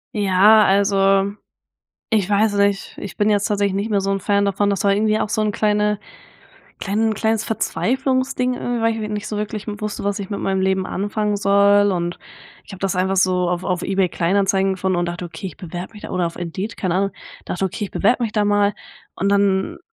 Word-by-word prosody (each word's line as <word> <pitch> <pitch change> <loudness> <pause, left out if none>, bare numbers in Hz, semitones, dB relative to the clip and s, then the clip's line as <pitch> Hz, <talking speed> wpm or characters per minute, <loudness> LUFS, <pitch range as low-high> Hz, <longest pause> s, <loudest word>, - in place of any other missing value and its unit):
Ja, 205 +2 +5
also, 195 0 +3 0.8
ich 210 -4 +1
weiß 210 0 +2
nicht. 200 -1 0
Ich 195 -4 -7
bin 210 +1 +2
jetzt 205 -1 +2
tatsächlich 200 -2 0
nicht 200 +3 -1
mehr 200 -2 +1
so 195 - -1
'n 195 - 0
Fan 200 +1 +1
davon. 200 +1 +1
Das 200 -1 -1
war 200 - +4
irgendwie 215 +1 +2
auch 210 - -2
so 220 - 0
'n 215 -1 0
kleine 210 0 +1 0.8
kleinen 220 +2 0
kleines 220 +1 0
Verzweiflungsding 255 +2 0
irgendwie, 245 -1 -3
weil 225 -1 0
ich 215 - -3
nicht 210 -1 -4
so 210 - -3
wirklich 210 0 -4
wusste, 210 -1 -5
was 205 +1 -1
ich 195 - -6
mit 200 - -4
meinem 190 0 0
Leben 190 0 +1
anfangen 205 +1 -1
soll. 200 0 +4
Und 175 -2 -2 0.5
ich - - -12
habe 190 - -10
das 195 -1 -1
einfach 190 +1 +1
so 180 -1 +2
auf 180 +1 -2
auf 180 -2 -1
eBay 190 -1 0
Kleinanzeigen 195 +2 +1
gefunden 190 0 -1
und 175 - 0
dachte: 175 +1 -5
„Okay, 175 +3 -7
ich 185 - -8
bewerbe 180 +3 -7
mich 210 - -12
da“ - - -7
oder 180 -2 0
auf 165 - -6
Indeed, 185 +5 -5
keine 180 -3 -1
Ahnung, 195 +1 +1 0.4
dachte: 185 - -2
„Okay, 190 +3 -3
ich 200 - -7
bewerbe 240 +5 +1
mich 225 -2 -1
da 210 -1 +1
mal.“ 205 0 +2 0.4
Und 200 +1 0
dann 200 -1 +1
200 Hz, 215 wpm, -20 LUFS, 190-210 Hz, 0.8 s, Ja